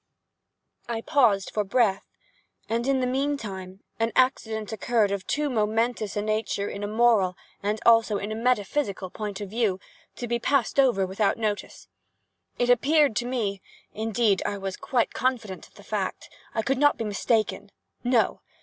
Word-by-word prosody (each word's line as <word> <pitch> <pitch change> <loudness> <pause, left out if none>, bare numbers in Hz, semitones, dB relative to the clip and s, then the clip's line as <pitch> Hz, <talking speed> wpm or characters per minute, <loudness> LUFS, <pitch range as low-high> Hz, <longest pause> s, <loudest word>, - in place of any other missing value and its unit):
I 230 -1 -2
paused 230 -9 +2
for 210 - +1
breath; 200 -1 +1 0.6
and, 235 +3 -1
in 270 -1 +2
the - - +1
meantime, 230 -9 -3 0.2
an 225 0 +1
accident 225 -5 +1
occurred 220 -1 +1
of 200 -2 -3
too 300 0 0
momentous 225 -2 0
a 205 - 0
nature 215 -1 -1
in 200 - -5
a - - -1
moral, 215 -4 +3 0.3
and 210 +2 -1
also 225 -2 +5
in 205 +2 -4
a - - -2
metaphysical 220 -4 0
point 210 -2 -5
of 200 -2 -6
view, 215 -5 0 0.4
to 240 - -5
be 235 0 0
passed 275 +1 +1
over 240 -8 +4
without 195 +2 0
notice. 215 -2 -3 0.7
It 245 0 +3
appeared 280 +1 +4
to 240 - -1
me—indeed 220 -1 -1
I 205 - -2
was 195 -1 -4
quite 245 -3 0
confident 235 -7 -2
of - - -30
the - - -14
fact—I 220 - -4
could 270 +2 0
not 290 0 +4
be - - -3
mistaken—no! 220 +2 -1
220 Hz, 155 wpm, -26 LUFS, 205-245 Hz, 0.7 s, also